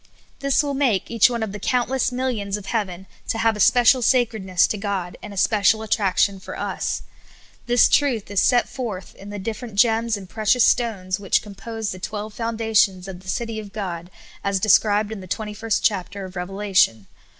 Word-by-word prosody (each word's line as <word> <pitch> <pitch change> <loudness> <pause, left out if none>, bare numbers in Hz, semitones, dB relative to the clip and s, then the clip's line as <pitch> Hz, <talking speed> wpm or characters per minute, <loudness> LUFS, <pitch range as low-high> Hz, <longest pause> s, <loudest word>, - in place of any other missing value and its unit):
This 275 +1 +2
will 285 -1 -2
make 260 -9 0
each 230 0 +5
one 235 -2 -2
of 215 - -4
the 210 - -7
countless 250 +4 0
millions 240 -6 -2
of 205 - -10
heaven 190 -5 -3 0.2
to - - -1
have 225 -1 +2
a - - -7
special 245 +4 +5
sacredness 220 -7 +2
to 215 - -2
God, 195 -4 -3
and 210 - -8
a 200 - -9
special 215 +2 +3
attrac 205 -3 0
tion 200 -2 +2
for - - -8
us. - - -3 0.6
This 245 0 +5
truth 250 -9 +1
is 200 - +2
set 245 -2 +3
forth 210 -8 -6
in 200 - -12
the 205 - -6
different 215 +2 -6
gems 225 0 +2
and 195 -2 -10
precious 220 +4 +3
stones 195 -6 0
which 195 -2 +1
compose 220 +1 -6
the 185 - -7
twelve 210 +3 -5
foundations 220 -5 +1
of 185 -2 -8
the 185 0 -11
cit}' 230 +1 -3
of 205 -2 -10
God, 175 -5 -5 0.3
as 200 -1 0
described 210 +1 +3
in 220 - -5
the 185 - -10
twenty 210 +3 -4
first 220 0 -1
chapter 200 0 -1
of 185 0 -11
Revelation. 185 - +1
210 Hz, 195 wpm, -22 LUFS, 195-230 Hz, 0.6 s, each